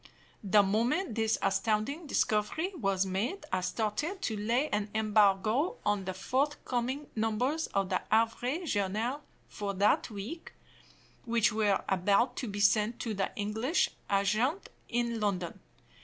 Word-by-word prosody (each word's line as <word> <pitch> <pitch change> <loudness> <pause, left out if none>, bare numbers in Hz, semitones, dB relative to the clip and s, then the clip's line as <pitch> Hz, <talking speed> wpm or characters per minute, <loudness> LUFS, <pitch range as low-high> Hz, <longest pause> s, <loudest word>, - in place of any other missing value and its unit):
The 205 +1 +5
moment 235 - +1
this 220 0 +1
astounding 235 +9 0
discovery 255 - 0
was 195 - 0
made, 220 - -2
I - - +1
started 230 - -2
to 220 - -1
lay 235 +7 +1
an 210 0 -1
embargo 215 - +3
on 205 -2 +1
the 185 - -3
forthcoming 260 +3 -1
numbers 240 +8 0
of 195 -1 -1
the 185 - 0
Havre 240 +9 +1
Journal 220 - -1 0.3
for 200 -1 -4
that 205 +5 +2
week, 225 - -7 0.7
which 230 -2 +2
were 210 -2 +2
about 200 +6 +2
to 250 - -3
be 205 -1 -5
sent 210 +3 +3
to 225 - -2
the 195 -1 -1
English 220 - 0 0.2
agent 215 - +1 0.2
in 235 -1 -1
London. 190 -5 -2
220 Hz, 135 wpm, -31 LUFS, 205-250 Hz, 0.7 s, The